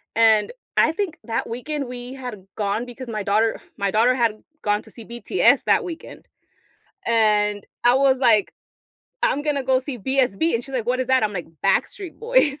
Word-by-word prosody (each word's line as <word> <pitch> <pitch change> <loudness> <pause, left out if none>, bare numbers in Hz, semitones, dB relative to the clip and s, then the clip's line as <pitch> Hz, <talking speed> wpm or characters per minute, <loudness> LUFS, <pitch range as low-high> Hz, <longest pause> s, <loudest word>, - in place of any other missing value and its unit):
And 220 - +4 0.2
I 315 - +4
think 345 -1 -3
that 230 - -2
weekend 275 +4 -4
we 245 +1 -7
had 245 -8 -8
gone 210 +3 -1
because 245 +1 -9
my 215 -2 -3
daughter 215 +3 +1 0.2
my 200 -1 0
daughter 230 +4 +4
had 230 -4 0 0.2
gone 210 0 +1
to - - -16
see 230 - -10
BTS 240 +10 +2
that - - +3
weekend 335 -3 -9 0.8
and 210 -3 +2 0.2
I 245 - +6
was, 265 0 +3
like, 225 -6 +3 0.7
"I'm 290 - +2
gonna 295 -2 0
go 260 0 +3
see 260 0 -5
BSB," 265 +5 +1
and 230 - 0
she's 270 - -10
like, 235 -3 -2
"What 255 +1 +1
is 255 - -2
that?" 260 -3 +4
I'm 210 - -1
like, 180 -4 -5 0.2
"Backstreet 375 -5 0
Boys." 455 - +2
245 Hz, 185 wpm, -22 LUFS, 215-270 Hz, 0.8 s, I